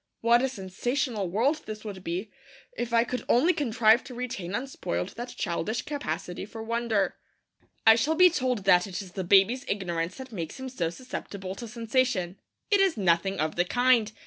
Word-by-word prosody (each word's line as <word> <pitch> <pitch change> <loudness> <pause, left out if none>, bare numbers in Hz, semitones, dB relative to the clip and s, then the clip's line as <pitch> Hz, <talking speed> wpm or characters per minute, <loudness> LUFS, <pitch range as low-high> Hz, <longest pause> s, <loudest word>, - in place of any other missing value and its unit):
What 235 +1 +5
a 265 - +1
sensational 220 0 -2
world 265 - +1
this 215 0 -7
would 195 -3 -7
be 185 +5 -4 0.4
if 240 -1 -3
I 230 0 +4
could 250 +1 -4
only 315 +10 +4
contrive 235 -6 +3
to 255 -1 -9
retain 230 -7 -4
unspoiled 205 - -3
that 240 +1 -8
childish 205 +5 -2
capacity 180 - -4
for 220 +2 -8
wonder! 230 -3 0 0.7
I 225 - +10
shall 290 +8 +1
be 360 +1 +7
told 250 - -1
that 180 -1 +5
it 195 +1 -5
is 185 - -13
the 190 +1 -4
baby's 200 +8 +4
ignorance 175 -3 -2
that 265 -1 -9
makes 170 0 -6
him 260 0 -5
so 175 -10 -2
susceptible 195 -3 -6
to 235 +4 -8
sensation. 225 -5 -1 0.3
It 405 - +5
is 385 -7 +3
nothing 190 0 +1
of 155 +1 -1
the 175 - +3
kind. 245 0 +3
220 Hz, 180 wpm, -27 LUFS, 190-250 Hz, 0.7 s, I